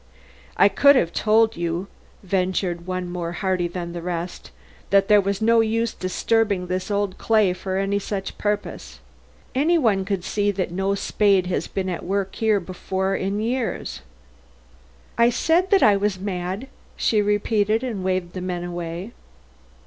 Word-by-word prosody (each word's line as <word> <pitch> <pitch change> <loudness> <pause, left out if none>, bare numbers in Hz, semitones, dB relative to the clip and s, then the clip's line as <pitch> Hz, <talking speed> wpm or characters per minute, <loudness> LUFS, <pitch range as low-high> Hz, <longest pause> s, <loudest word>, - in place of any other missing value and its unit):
"I - - +7
could 280 +8 +5
have 170 -10 +1
told 220 +1 +3
you," 170 +2 -2 0.4
ventured 185 -2 -1
one 185 -1 -3
more 175 -1 -4
hardy 185 -1 0
than 170 -1 -6
the 170 - -5
rest, 175 0 -5 0.4
"that 195 0 +3
there 210 -1 +7
was 200 +2 -2
no 230 +1 +5
use 225 +1 0
disturbing 200 +1 0
this 185 +2 -3
old 200 -2 -1
clay 215 -5 +3
for 190 +1 -4
any 195 +1 0
such 195 -1 -4
purpose. 205 - -3 0.5
Any 310 +7 +3
one 215 -10 +2
could 195 -2 -2
see 205 +1 0
that 185 -2 -2
no 195 +2 0
spade 200 -2 +2
has 180 - -2
been 190 -1 -3
at 180 -2 -3
work 195 +1 -2
here 220 -2 +2
before 190 +1 -3
in 195 +2 -2
years." 230 - -2 1.2
"I 235 0 +6
said 330 +9 +2
that 395 0 +4
I 205 - +6
was 200 -1 -1
mad," 190 +3 -3 0.3
she 215 -2 +2
repeated, 210 +2 +1
and 220 -7 -3
waved 185 -2 -1
the 185 - -5
men 180 -1 -3
away. 175 +3 -5
195 Hz, 160 wpm, -23 LUFS, 180-215 Hz, 1.2 s, I